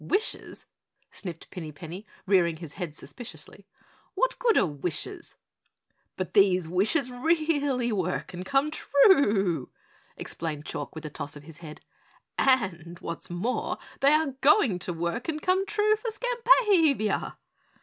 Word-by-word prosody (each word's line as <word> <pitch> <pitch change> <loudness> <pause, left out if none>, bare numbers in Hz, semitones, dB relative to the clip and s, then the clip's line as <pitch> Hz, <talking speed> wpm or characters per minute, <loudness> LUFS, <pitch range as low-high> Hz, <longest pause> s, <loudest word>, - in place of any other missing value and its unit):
"Wishes?" 410 +3 -2 0.5
sniffed 175 -5 -7
Pinny 160 -5 -6
Penny, 170 +7 -9 0.2
rearing 180 -4 +3
his 160 -3 -9
head 170 -5 -5
suspiciously. 245 +8 -9 0.5
"What - - +1
good 470 -3 +3
are - - +5
wishes?" 175 - -4 0.8
"But 185 -2 -4
these 185 -4 +4
wishes 215 - +2
really 285 -3 +1
work 185 -3 -2
and 180 +1 -5
come 275 +8 +1
true," 210 - +3 0.5
explained 155 -2 -5
Chalk - - -5
with 160 0 -7
a 150 - -6
toss 145 0 -6
of 145 - -11
his 160 +1 -13
head, 155 -3 -10 0.6
"and 180 -10 +1
what's 170 0 -6
more 180 +9 -2 0.2
they 280 +2 +5
are 305 -3 +2
going 270 - +4
to 180 - -3
work 170 - -3
and 310 -1 -2
come 370 +4 +1
true 425 +1 +2
for 460 +2 -4
Skampavia!" 430 - +2
210 Hz, 140 wpm, -27 LUFS, -, 0.8 s, are